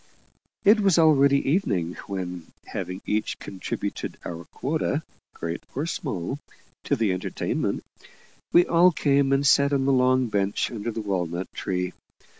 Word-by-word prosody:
It 210 Hz, +2 st, +7 dB
was 195 Hz, -4 st, +3 dB
already 140 Hz, -4 st, +5 dB
evening, 95 Hz, -, +1 dB
when, 90 Hz, -3 st, -5 dB, 0.2 s
having 90 Hz, +1 st, -5 dB
each 105 Hz, +1 st, -1 dB
contributed 95 Hz, -2 st, -5 dB
our 85 Hz, 0 st, -6 dB
quota, -, -, -2 dB, 0.3 s
great 85 Hz, +1 st, -4 dB
or 145 Hz, +4 st, -1 dB
small, 135 Hz, -, -3 dB, 0.5 s
to 140 Hz, -, +2 dB
the 110 Hz, -6 st, +1 dB
entertainment, 90 Hz, -, -2 dB, 0.7 s
we 175 Hz, +1 st, +6 dB
all 175 Hz, +2 st, +5 dB
came 140 Hz, -3 st, +2 dB
and 135 Hz, +1 st, +2 dB
sat 140 Hz, +1 st, +5 dB
on 135 Hz, -1 st, +1 dB
the 135 Hz, -, +3 dB
long 130 Hz, 0 st, +3 dB
bench 100 Hz, -3 st, 0 dB
under 115 Hz, -1 st, -4 dB
the 115 Hz, 0 st, -3 dB
walnut 90 Hz, -3 st, -3 dB
tree. 90 Hz, -1 st, -2 dB
120 Hz, 140 wpm, -25 LUFS, 90-140 Hz, 0.7 s, It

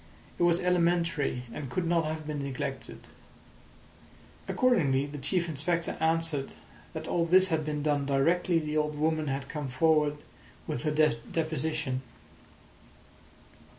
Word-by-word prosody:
It -, -, -3 dB
was 175 Hz, 0 st, +4 dB
elementary, 170 Hz, -7 st, +1 dB
and 145 Hz, -4 st, -6 dB
could 175 Hz, +7 st, -1 dB
not 165 Hz, -1 st, +2 dB
have 155 Hz, 0 st, -4 dB
been 150 Hz, -1 st, -3 dB
neglected. 135 Hz, -2 st, -5 dB, 1.5 s
Accordingly 150 Hz, -, +2 dB
the 145 Hz, 0 st, -7 dB
Chief 170 Hz, +5 st, 0 dB
Inspector 165 Hz, +2 st, -1 dB
answered 160 Hz, -3 st, +1 dB, 0.4 s
that -, -, -6 dB
all 170 Hz, -1 st, +1 dB
this 185 Hz, +2 st, +5 dB
had 160 Hz, -2 st, 0 dB
been 150 Hz, -1 st, -3 dB
done 145 Hz, -2 st, +1 dB
directly 165 Hz, +6 st, +2 dB
the 155 Hz, -1 st, -1 dB
old 150 Hz, 0 st, 0 dB
woman 155 Hz, 0 st, 0 dB
had 135 Hz, 0 st, -2 dB
come 150 Hz, -2 st, -4 dB
forward 150 Hz, +2 st, +2 dB, 0.5 s
with 120 Hz, -, -3 dB
her 150 Hz, -, 0 dB, 0.4 s
deposition. 155 Hz, -4 st, -2 dB
155 Hz, 130 wpm, -29 LUFS, 145-170 Hz, 1.5 s, this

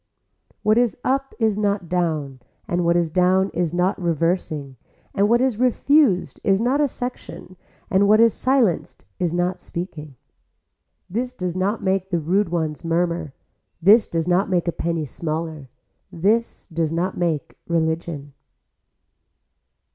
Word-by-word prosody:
What 215 Hz, +2 st, +4 dB
is 240 Hz, -2 st, +1 dB
up 270 Hz, +1 st, -1 dB
is 220 Hz, -3 st, +1 dB
not 200 Hz, -3 st, 0 dB
down 155 Hz, -6 st, -1 dB, 0.3 s
and 175 Hz, 0 st, 0 dB
what 170 Hz, 0 st, +3 dB
is 170 Hz, -2 st, 0 dB
down 185 Hz, +2 st, +3 dB
is 170 Hz, -2 st, 0 dB
not 180 Hz, +3 st, 0 dB
reversing 165 Hz, -4 st, -1 dB, 0.4 s
and 200 Hz, +1 st, +2 dB
what 240 Hz, +1 st, +4 dB
is 255 Hz, -4 st, +1 dB
refused 255 Hz, -, +2 dB
is 195 Hz, -1 st, +3 dB
not 255 Hz, +6 st, +1 dB
a 290 Hz, -, +3 dB
section 245 Hz, -7 st, -7 dB, 0.3 s
and 200 Hz, -1 st, +3 dB
what 215 Hz, +1 st, +5 dB
is 230 Hz, -1 st, +5 dB
silenced 255 Hz, -9 st, 0 dB
is 175 Hz, -3 st, 0 dB
not 175 Hz, +1 st, -1 dB
speaking. 155 Hz, -5 st, -7 dB, 0.9 s
This 245 Hz, +6 st, -3 dB
does 180 Hz, -7 st, -4 dB
not 195 Hz, +4 st, -1 dB
make 190 Hz, 0 st, 0 dB
the 175 Hz, -, 0 dB
rude 185 Hz, +5 st, +1 dB
ones 160 Hz, -3 st, -2 dB
murmur, 170 Hz, -3 st, -1 dB, 0.4 s
this 205 Hz, +6 st, +6 dB
does 165 Hz, 0 st, -2 dB
not 180 Hz, +3 st, +2 dB
make 180 Hz, -2 st, 0 dB
a -, -, +2 dB
penny 165 Hz, -2 st, -2 dB
smaller, 155 Hz, 0 st, -5 dB, 0.4 s
this 215 Hz, +7 st, 0 dB
does 165 Hz, -3 st, -2 dB
not 175 Hz, +3 st, -1 dB
make 165 Hz, -5 st, -2 dB
religion. 160 Hz, -3 st, -2 dB
180 Hz, 145 wpm, -22 LUFS, 165-210 Hz, 0.9 s, this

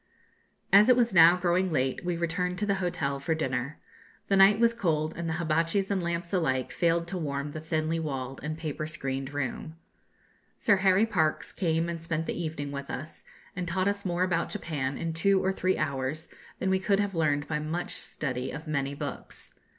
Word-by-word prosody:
As 205 Hz, +4 st, +8 dB
it 250 Hz, -, +8 dB
was 235 Hz, -3 st, +2 dB
now 170 Hz, 0 st, +8 dB
growing 180 Hz, +1 st, +1 dB
late, 130 Hz, -3 st, 0 dB
we 175 Hz, -1 st, -1 dB
returned 180 Hz, +2 st, -1 dB
to 210 Hz, -, 0 dB
the 200 Hz, -, +2 dB
hotel 140 Hz, -6 st, -1 dB
for 160 Hz, +4 st, 0 dB
dinner. 130 Hz, -1 st, -2 dB, 0.5 s
The 200 Hz, -, +4 dB
night 195 Hz, +2 st, +6 dB
was 235 Hz, 0 st, +4 dB
cold, 160 Hz, -8 st, 0 dB
and 170 Hz, -1 st, -3 dB
hibatchis 165 Hz, +4 st, 0 dB
and 195 Hz, -2 st, +1 dB
lamps 170 Hz, +1 st, -3 dB
alike 130 Hz, -8 st, 0 dB
failed 170 Hz, 0 st, +1 dB
to 185 Hz, -1 st, -3 dB
warm 145 Hz, -2 st, -3 dB
the 155 Hz, -, -6 dB
thinly 160 Hz, +1 st, -1 dB
walled 135 Hz, -4 st, -4 dB
and 155 Hz, +1 st, -4 dB
paper 155 Hz, -1 st, -4 dB
screened 135 Hz, -4 st, -3 dB
room. 145 Hz, +2 st, -4 dB, 0.8 s
Sir 205 Hz, -2 st, +3 dB
Harry 190 Hz, +2 st, +4 dB
Parkes 160 Hz, -8 st, 0 dB
came 165 Hz, -2 st, 0 dB
and 170 Hz, -1 st, -4 dB
spent 165 Hz, -1 st, -2 dB
the -, -, -2 dB
evening 155 Hz, -4 st, -4 dB
with 140 Hz, 0 st, -6 dB
us, 155 Hz, +5 st, -7 dB, 0.3 s
and 180 Hz, -1 st, -3 dB
taught 185 Hz, +3 st, 0 dB
us 200 Hz, 0 st, -1 dB
more 175 Hz, -1 st, 0 dB
about 175 Hz, -2 st, 0 dB
Japan 140 Hz, -4 st, -3 dB
in 165 Hz, -1 st, -3 dB
two 190 Hz, +4 st, +3 dB
or 190 Hz, -, +2 dB
three 185 Hz, 0 st, 0 dB
hours 145 Hz, +2 st, -2 dB, 0.3 s
than 190 Hz, -, 0 dB
we 190 Hz, -, +3 dB
could 195 Hz, +1 st, +2 dB
have 205 Hz, -1 st, 0 dB
learned 145 Hz, -4 st, +1 dB
by 150 Hz, -1 st, -1 dB
much 160 Hz, +4 st, -3 dB
study 130 Hz, -3 st, -3 dB
of 150 Hz, +2 st, -7 dB
many 140 Hz, -2 st, -1 dB
books. -, -, -7 dB
165 Hz, 195 wpm, -28 LUFS, 150-185 Hz, 0.8 s, As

